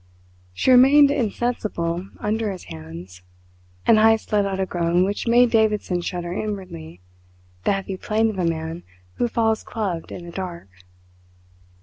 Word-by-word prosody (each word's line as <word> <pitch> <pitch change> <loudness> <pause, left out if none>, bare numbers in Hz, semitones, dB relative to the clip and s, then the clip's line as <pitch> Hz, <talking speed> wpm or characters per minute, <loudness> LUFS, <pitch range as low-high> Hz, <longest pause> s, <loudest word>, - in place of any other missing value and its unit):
She 260 - +2
remained 275 +3 +7
insensible 210 -8 -2
under 215 0 -1
his 185 - -8
hands, 85 +4 -10 0.6
and 220 - +5
Heyst 225 +1 +3
let 205 -1 +2
out 195 -1 -3
a 190 - +1
groan 175 0 +1
which 200 +4 -2
made 240 0 +5
Davidson 210 -5 +1
shudder 175 0 -4
inwardly 180 - -6 0.6
the - - +3
heavy 195 -1 -4
plaint 220 +3 0
of 195 - -7
a - - +1
man 160 +1 -4 0.4
who 240 - +1
falls 225 -1 +1
clubbed 195 -7 -4
in 175 - -8
the 170 - -9
dark. 175 - -6
195 Hz, 145 wpm, -22 LUFS, 170-225 Hz, 0.6 s, remained